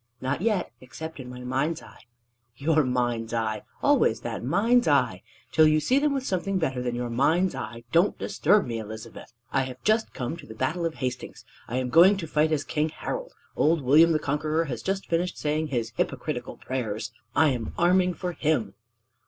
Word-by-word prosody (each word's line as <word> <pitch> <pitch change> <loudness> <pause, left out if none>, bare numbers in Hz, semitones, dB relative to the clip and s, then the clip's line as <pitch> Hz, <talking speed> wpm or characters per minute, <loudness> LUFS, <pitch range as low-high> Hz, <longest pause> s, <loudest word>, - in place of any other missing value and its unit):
"Not 130 +5 -2
yet 210 -3 0
except 140 +6 -8
in 125 -1 -8
my 125 0 -8
mind's 135 +6 -1
eye." - - -16 0.5
"Your 155 +2 +2
mind's 120 -3 -1
eye! 110 -2 -1 0.2
Always - - +3
that - - -5
mind's 225 - +3
eye! - - +2 0.3
Till 155 -1 +6
you 155 0 +4
see 255 - +2
them 295 0 +2
with 270 -2 -2
something 195 -1 -1
better 135 -7 -1
than 120 -1 -2
your 120 0 -3
mind's 160 +9 +2
eye, 115 +1 -6
don't 170 +4 +3
disturb 200 +6 +2
me, 115 -2 -3
Elizabeth. 110 +1 -9 0.2
I 135 - +3
have 130 0 -9
just 220 +1 +2
come 125 +6 -4
to - - -12
the 110 - -10
Battle 160 +9 -1
of 160 - -7
Hastings. 125 -2 -5 0.2
I 125 - -3
am 130 -1 -1
going 185 +7 +7
to 180 - -4
fight 155 0 +1
as 150 -2 +1
King 155 0 -1
Harold. - - -5 0.2
Old 155 -1 +2
William 155 +6 +6
the 155 - +3
Conqueror 155 +2 -1
has 120 -6 -5
just 195 - -2
finished 175 +2 -1
saying 155 +1 -1
his 120 -5 -2
hypocritical - - -3
prayers. 115 -3 -4 0.2
I 155 0 +5
am 120 -5 -3
arming 180 +1 +3
for 180 +1 -3
him!" 145 - 0
150 Hz, 195 wpm, -26 LUFS, 125-170 Hz, 0.5 s, going